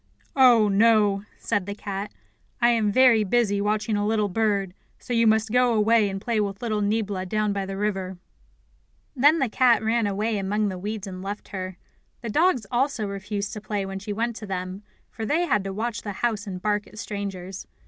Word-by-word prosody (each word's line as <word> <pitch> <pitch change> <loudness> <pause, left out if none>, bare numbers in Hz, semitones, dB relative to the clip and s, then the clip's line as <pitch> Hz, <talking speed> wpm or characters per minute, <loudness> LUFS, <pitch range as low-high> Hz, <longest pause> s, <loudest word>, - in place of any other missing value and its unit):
"Oh, 245 -5 +6
no," 205 -1 +3
said 205 -4 -2
the 200 - -4
cat. 200 0 -5 0.5
"I 240 0 +4
am 225 -3 +2
very 240 -2 +5
busy 205 -1 +1
watching 215 +1 0
a 205 - 0
little 210 -1 +1
bird, 200 -2 0 0.2
so 245 - -6
you 230 -1 +3
must 220 0 +2
go 250 -1 +3
away 215 0 +3
and 195 0 -4
play 220 +1 0
with 200 -1 -3
little 215 -3 -1
Niebla 205 -2 -1
down 215 +1 0
by 195 -1 -3
the 195 0 -5
river." 190 -3 -2 1.0
Then 290 +5 +5
the 270 - +1
cat 240 0 +3
ran 225 0 +1
away 210 +2 -1
among 205 +2 0
the 185 -1 -5
weeds 210 +1 -4
and 185 -2 -7
left 200 +2 -6
her. 185 -2 -5 0.4
The 235 - -5
dogs 305 - +2
also 245 -3 0
refused 200 +1 -4
to 210 - -6
play 205 -2 -3
when 195 0 -5
she 205 +2 -6
went 230 +3 -1
to 215 - -8
them, 185 0 -4 0.3
for 225 - -7
they 315 +10 +1
had 210 - +1
to 195 - -3
watch 220 +3 -3
the 205 - -5
house 215 0 -2
and 185 -2 -5
bark 210 +1 -1
at 215 - -15
strangers. 195 -3 -6
210 Hz, 200 wpm, -25 LUFS, 195-225 Hz, 1.0 s, Oh